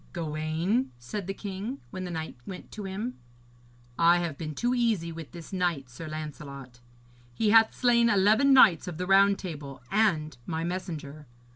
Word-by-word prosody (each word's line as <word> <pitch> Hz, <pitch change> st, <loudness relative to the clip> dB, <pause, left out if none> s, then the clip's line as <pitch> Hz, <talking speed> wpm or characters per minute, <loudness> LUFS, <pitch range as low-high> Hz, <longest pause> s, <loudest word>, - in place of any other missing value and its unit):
'Gawaine,' 165 Hz, -, -1 dB
said 175 Hz, -, -6 dB
the 195 Hz, -, -2 dB
king, 205 Hz, +7 st, -5 dB
when 185 Hz, 0 st, -5 dB
the -, -, -5 dB
knight 160 Hz, -2 st, -5 dB
went 185 Hz, -2 st, -8 dB
to 210 Hz, -2 st, -7 dB
him, 210 Hz, +6 st, -5 dB, 0.8 s
'I 170 Hz, +1 st, +6 dB
have 170 Hz, -4 st, -2 dB
been 155 Hz, 0 st, -6 dB
too 245 Hz, -, 0 dB
easy 225 Hz, -9 st, +1 dB
with 165 Hz, -2 st, -9 dB
this 170 Hz, +2 st, -10 dB
knight, 170 Hz, -9 st, -1 dB
Sir 155 Hz, +7 st, -8 dB
Lancelot. 140 Hz, -5 st, -8 dB, 0.6 s
He 215 Hz, -2 st, +2 dB
hath 225 Hz, 0 st, +6 dB
slain 235 Hz, -1 st, +4 dB
eleven 215 Hz, +6 st, +4 dB
knights 200 Hz, -, +6 dB
of 175 Hz, -3 st, -5 dB
the 180 Hz, -, -2 dB
Round 195 Hz, +1 st, +5 dB
Table 145 Hz, -7 st, -7 dB
and 170 Hz, -9 st, +2 dB
my 160 Hz, -1 st, -2 dB
messenger. 160 Hz, -5 st, -5 dB
175 Hz, 165 wpm, -28 LUFS, 155-205 Hz, 0.8 s, I